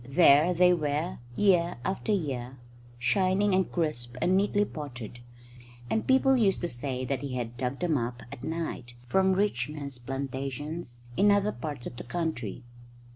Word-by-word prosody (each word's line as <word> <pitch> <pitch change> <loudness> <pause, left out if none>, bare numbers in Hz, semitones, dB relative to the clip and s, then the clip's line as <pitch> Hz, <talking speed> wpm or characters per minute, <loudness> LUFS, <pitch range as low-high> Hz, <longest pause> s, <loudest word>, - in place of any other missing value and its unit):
There 150 +2 +6
they 180 +1 +5
were, 155 +1 -1 0.2
year 180 -4 +3
after 195 +3 -1
year, 135 -9 -2 0.4
shining 190 +10 +2
and 190 0 +2
crisp 125 -8 -2
and 180 +8 +3
neatly 205 +1 +2
potted; 125 - -7 0.7
and 220 - 0
people 265 0 +5
used 210 -6 +2
to 175 - 0
say 130 +1 -3
that 130 +1 -1
he 135 -2 -4
had 120 -1 -3
dug 125 +4 -3
them 165 -6 +2
up 120 +1 -4
at - - -9
night 160 -7 -4
from 190 +9 +3
rich 185 -11 0
men's 140 -4 -6
plantations 135 +1 -5
in 205 +1 +5
other 205 +1 +3
parts 145 -10 -6
of 120 - -7
the - - -6
country. 125 - -3
150 Hz, 160 wpm, -28 LUFS, 125-185 Hz, 0.7 s, There